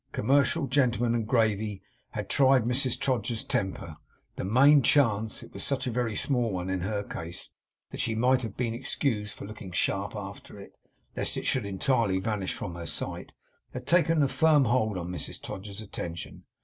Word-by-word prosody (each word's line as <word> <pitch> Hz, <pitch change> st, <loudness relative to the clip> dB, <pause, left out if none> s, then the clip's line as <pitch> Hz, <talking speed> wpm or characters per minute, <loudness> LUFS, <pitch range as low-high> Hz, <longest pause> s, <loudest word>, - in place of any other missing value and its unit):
Commercial 140 Hz, +5 st, +2 dB
gentlemen 120 Hz, -4 st, +2 dB
and 115 Hz, -2 st, -1 dB
gravy 110 Hz, -4 st, +1 dB, 0.3 s
had -, -, -4 dB
tried 135 Hz, -3 st, +4 dB
Mrs 125 Hz, +2 st, 0 dB
Todgers's 120 Hz, -4 st, -1 dB
temper; 90 Hz, -5 st, -3 dB, 0.4 s
the -, -, -4 dB
main 135 Hz, +9 st, +6 dB
chance 110 Hz, -5 st, +2 dB
it -, -, -14 dB
was -, -, -5 dB
such 135 Hz, -2 st, -1 dB
a 125 Hz, -, -1 dB
very 115 Hz, -2 st, -1 dB
small 120 Hz, -3 st, +1 dB
one 90 Hz, 0 st, -2 dB
in 95 Hz, -, 0 dB
her 100 Hz, +3 st, -2 dB
case, 85 Hz, -3 st, -7 dB, 0.4 s
that -, -, -7 dB
she 115 Hz, -, 0 dB
might 125 Hz, +3 st, +3 dB
have 110 Hz, -4 st, -6 dB
been 120 Hz, -2 st, -1 dB
excused 115 Hz, -3 st, -2 dB
for -, -, -8 dB
looking 105 Hz, -2 st, -9 dB
sharp 100 Hz, +3 st, -1 dB
after 100 Hz, 0 st, -8 dB
it, 100 Hz, -, -12 dB, 0.4 s
lest -, -, -1 dB
it -, -, -4 dB
should 125 Hz, -6 st, +1 dB
entirely 100 Hz, 0 st, +1 dB
vanish 100 Hz, -2 st, -2 dB
from 90 Hz, -4 st, -5 dB
her 85 Hz, -1 st, -7 dB
sight -, -, -5 dB, 0.4 s
had 125 Hz, 0 st, -5 dB
taken 165 Hz, 0 st, +4 dB
a -, -, +3 dB
firm 150 Hz, -1 st, +4 dB
hold 110 Hz, -4 st, +1 dB
on 90 Hz, -1 st, -4 dB
Mrs 90 Hz, -, -5 dB
Todgers's 100 Hz, +2 st, -7 dB
attention. 85 Hz, -5 st, -7 dB
110 Hz, 180 wpm, -28 LUFS, 100-130 Hz, 0.4 s, main